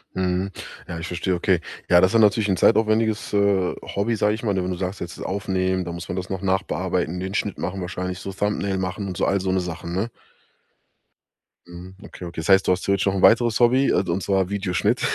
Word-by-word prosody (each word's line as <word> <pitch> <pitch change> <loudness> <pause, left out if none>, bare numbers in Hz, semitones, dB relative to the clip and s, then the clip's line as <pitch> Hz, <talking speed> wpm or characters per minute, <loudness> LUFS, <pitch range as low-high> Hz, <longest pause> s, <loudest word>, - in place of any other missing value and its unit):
Mhm, 95 +1 -1 0.4
ja, 85 -2 -5
ich 85 - -5
verstehe, 90 +1 -2
okay. 90 0 +2 0.3
Ja, 85 - +7
das 95 +3 +3
ist 115 - +5
natürlich 105 0 +4
'n 95 - +2
zeitaufwendiges, 110 0 +2
äh, 100 -3 +2 0.2
Hobby, 110 +3 +1
sage 105 0 +1
ich 110 - -9
mal, 100 -3 0
wenn 90 -1 -1
du 90 - -3
sagst: 90 +2 -4
„Jetzt 85 -1 -6
das - - -7
aufnehmen, 95 -1 -1
dann 85 0 -5
muss 85 -1 -7
man 90 - -4
das 95 -1 -4
noch 95 0 -4
nachbearbeiten, 95 -2 -1
den 95 +1 -4
Schnitt 100 -1 -2
machen, 95 +1 -4
wahrscheinlich 90 0 -4
so 95 - -6
Thumbnail 100 0 -1
machen 95 +2 -3
und 90 -2 -5
so“, - - +1
alle 100 -1 +1
so 95 0 -1
'ne 95 - +2
Sachen, 85 -1 -5
ne? 110 +5 -1 1.6
Mhm, 90 +2 -11
okay, 90 - -10
okay. 85 -1 -6
Das 80 - -6
heißt, 95 0 +5
du - - +4
hast 90 - -4
ja 100 - +3
jetzt 95 0 0
noch 100 - +2
'n 95 - -1
weiteres 115 +1 +5
Hobby, 130 +3 +4
äh, - - +2
und 90 +3 0
zwar 95 -1 +1
Videoschnitt 100 -4 0
95 Hz, 235 wpm, -23 LUFS, 90-100 Hz, 1.6 s, Ja